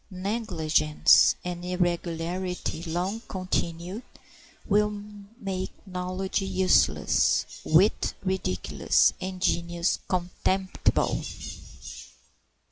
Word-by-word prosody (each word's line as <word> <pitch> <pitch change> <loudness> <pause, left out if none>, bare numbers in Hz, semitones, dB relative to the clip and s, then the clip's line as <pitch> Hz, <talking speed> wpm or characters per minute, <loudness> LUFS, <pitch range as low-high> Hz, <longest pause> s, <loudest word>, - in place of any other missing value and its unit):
Negligence 180 -7 +3
and 175 -1 -4
irregularity 175 -1 -2
long 180 +6 -2
continued 185 +1 -3 0.7
will 210 +1 +3 0.5
make 190 -4 -3 0.2
knowledge 185 +1 -2
useless, 190 -1 +3 0.2
wit 180 +7 +3
ridiculous, 185 - +1
and 185 0 -4
genius 170 -1 0
contemptible. 185 +1 0
185 Hz, 65 wpm, -27 LUFS, 170-190 Hz, 0.7 s, Negligence